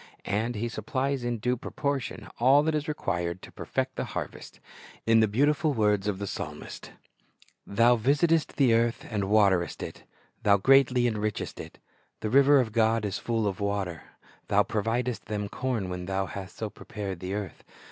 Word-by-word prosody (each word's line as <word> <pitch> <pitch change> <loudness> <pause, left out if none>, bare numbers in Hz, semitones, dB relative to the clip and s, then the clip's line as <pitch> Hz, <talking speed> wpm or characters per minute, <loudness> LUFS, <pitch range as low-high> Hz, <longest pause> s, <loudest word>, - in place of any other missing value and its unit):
And 110 +5 -1
He 110 +3 -2
supplies 130 +4 -2
in 120 -1 -1
due 125 +3 0
proportion 130 -4 -3
all 135 +4 +6
that 160 +1 +1
is 150 +1 -1
required 90 - -2
to - - -11
perfect - - -3
the - - -1
harvest. - - -6 0.5
In 115 0 +5
the 110 - +4
beautiful 145 +6 +2
words 105 -2 +2
of 105 -2 0
the 100 - -4
psalmist: - - -7 0.4
— - - -32
"Thou 115 +4 +4
visitest 150 +7 +2
the 130 -5 +4
earth, 115 0 +1
and 100 -3 -1
waterest 100 -5 +3
it; - - -8 0.4
Thou 100 -1 +5
greatly 130 +2 +4
enrichest 110 -3 -2
it; - - -9 0.4
The 110 - -2
river 140 +2 +6
of 120 -4 0
God 110 0 +2
is 105 0 -2
full 115 -2 -1
of 100 -2 -2
water; 100 -5 -2 0.5
Thou - - +4
providest 115 0 -2
them 105 -1 -3
corn 120 -3 -2
when 90 0 -5
Thou 95 0 0
hast 95 0 -8
so 110 -2 -4
prepared 100 -4 -6
the 95 +2 -4
earth. 100 -6 -6
110 Hz, 175 wpm, -28 LUFS, 100-125 Hz, 0.5 s, all